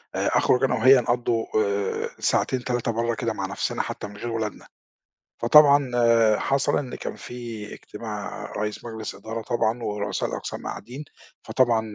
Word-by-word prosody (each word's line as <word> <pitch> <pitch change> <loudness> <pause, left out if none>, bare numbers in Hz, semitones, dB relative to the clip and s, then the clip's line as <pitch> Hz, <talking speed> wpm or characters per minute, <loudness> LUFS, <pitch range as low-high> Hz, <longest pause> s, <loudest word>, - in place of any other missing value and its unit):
آآ - - 0
أخرج 125 - +3
أنا 135 - +3
وهي 130 0 +7
نقضوا 120 -1 0 0.2
آآ 100 -1 -1
ساعتين، 130 -2 +1
3، 120 -1 -1
برّا 115 0 -1
كده 115 +1 -2
مع 95 - -3
نَفْسنا 95 - -2
حتى - - -5
من 100 0 -12
غير 120 +2 -4
ولادنا، 110 -2 -4 0.8
فطبعًا 140 +1 +6 0.5
حصل 140 0 +1
إن 135 -4 -4
كان - - -6
في 115 -4 -7
إجتماع 105 -1 -7
رئيس 105 0 -3
مجلس 110 -2 -6
إدارة 115 +1 -6
طبعًا 115 +1 0
ورؤساء 105 -1 -2
الأقسام - - -5
قاعدين، 125 +8 -7 0.4
فطبعًا 120 -3 +2
115 Hz, 150 wpm, -25 LUFS, 105-125 Hz, 0.8 s, وهي